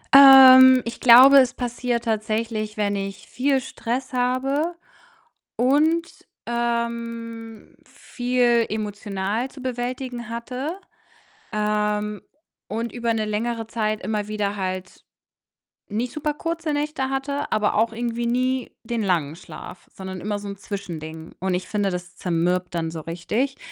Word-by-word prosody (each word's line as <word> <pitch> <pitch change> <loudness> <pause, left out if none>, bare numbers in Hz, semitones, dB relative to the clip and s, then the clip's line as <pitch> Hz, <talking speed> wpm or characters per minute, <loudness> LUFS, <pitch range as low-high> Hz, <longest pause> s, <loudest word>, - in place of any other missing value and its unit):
Ähm, 260 -1 +10
ich 235 - -6
glaube, 255 +3 +9
es 255 -2 +3
passiert 240 -1 -2
tatsächlich, 215 0 -2
wenn 205 -1 0
ich 195 0 -5
viel 270 +1 +1
Stress 255 +1 -4
habe 270 +6 0 0.8
und, 310 +6 +1 0.2
ähm, 235 -1 -4
viel 245 -2 0
emotional 210 +2 -3
zu 265 - -12
bewältigen 250 -1 -4
hatte, 250 +8 -5 0.8
ähm, 210 0 -1 0.5
und 230 +3 -3
über 235 -1 -1
'ne 220 -1 -1
längere 225 +2 -2
Zeit 215 -1 -2
immer 210 -2 -2
wieder 210 -1 -2
halt 185 -1 -5 0.8
nicht 235 +4 -3
super 300 -1 -2
kurze 330 -1 -3
Nächte 290 -2 -2
hatte, 280 +2 -3
aber 215 -1 +1
auch 225 +2 +2
irgendwie 235 0 -2
nie 255 +1 -1
den 230 -1 -3
langen 165 -6 0
Schlaf, 180 - -11
sondern 190 -1 -7
immer 205 +1 -3
so 205 - -8
'n 200 - -6
Zwischending 160 -6 -7
und 185 0 -1
ich 180 - -3
finde, 205 -2 0
das 180 -1 -6
zermürbt 180 +1 -1
dann 165 -1 -2
so 160 -1 -6
richtig 210 - -2
230 Hz, 130 wpm, -23 LUFS, 205-255 Hz, 0.8 s, Ähm